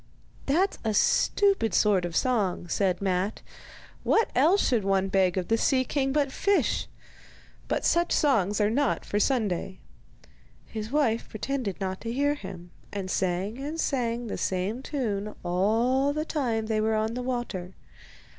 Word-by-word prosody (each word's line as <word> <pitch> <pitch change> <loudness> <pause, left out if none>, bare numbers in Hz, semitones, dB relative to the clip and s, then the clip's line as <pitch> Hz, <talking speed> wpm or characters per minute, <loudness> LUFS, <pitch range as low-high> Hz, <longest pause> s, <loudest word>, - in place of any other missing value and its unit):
'That's 355 +8 +1
a 220 -2 0
stupid 395 - +3
sort 200 -4 +3
of 170 -1 -5
song,' 205 -9 0
said 185 +1 0
Matte. 190 +2 -1 0.6
'What 445 - +2
else 330 +10 +4
should 235 -5 +1
one 195 0 +1
beg 190 -1 +2
of 180 - -1
the 225 0 +2
sea 260 -2 +3
king 270 +1 0
but 280 -1 +1
fish? 400 +7 +1 0.8
But - - -1
such 345 0 +2
songs 210 -9 +2
are 210 0 +2
not 280 +2 0
for 205 - -1
Sunday.' 210 - 0 0.9
His 220 0 -6
wife 255 -6 +1
pretended 225 -3 -3
not 190 -1 -3
to 230 - -4
hear 285 +4 +1
him, 185 -9 -9 0.2
and 190 -2 -4
sang 190 +5 -1
and 300 +4 -5
sang 240 -5 -1
the 220 - -4
same 195 +6 -1
tune 215 -8 -3
all 230 +10 +2
the 305 +1 -2
time 240 -9 -1
they 215 -1 0
were 220 0 +1
on 220 +1 0
the 250 - -3
water. 240 -8 -4
225 Hz, 155 wpm, -27 LUFS, 195-270 Hz, 0.9 s, else